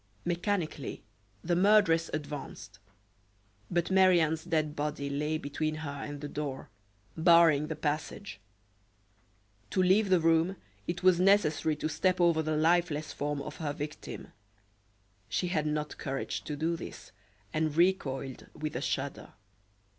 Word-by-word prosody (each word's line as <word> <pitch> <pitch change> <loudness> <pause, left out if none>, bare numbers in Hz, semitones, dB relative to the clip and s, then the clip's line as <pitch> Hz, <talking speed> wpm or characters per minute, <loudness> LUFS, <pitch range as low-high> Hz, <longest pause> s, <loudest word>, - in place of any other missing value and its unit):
Mechanically 175 0 -2 0.4
the 175 +1 +1
murderess 180 -4 +4
advanced; 145 -10 -6 0.9
but 175 +1 0
Marie 185 -2 +6
Anne's 160 0 0
dead 155 -3 0
body 145 -1 -3
lay 150 +2 -1
between 155 +1 -2
her 155 -2 -5
and 145 0 -6
the 145 - -4
door, 145 -2 -5 0.4
barring 165 -3 +5
the 160 - -3
passage. 150 - -3 1.3
To 185 - +2
leave 195 +3 +4
the 185 -2 +5
room 165 +3 +3 0.3
it 175 +1 -3
was 185 -2 +5
necessary 180 -5 +3
to 150 - -2
step 180 +4 +1
over 170 -2 +4
the 155 -1 -1
lifeless 160 -2 +1
form 145 -1 -2
of 150 - -8
her 150 -3 -3
victim. 150 0 -7 1.0
She 180 - -1
had 155 -4 0
not 150 0 -3
courage 135 -2 -3
to 150 - -3
do 160 +3 0
this, - - -9 0.4
and 155 -1 0
recoiled 135 -8 0
with 155 -2 -4
a 125 - -2
shudder. 140 0 -3
155 Hz, 140 wpm, -30 LUFS, 150-175 Hz, 1.3 s, Marie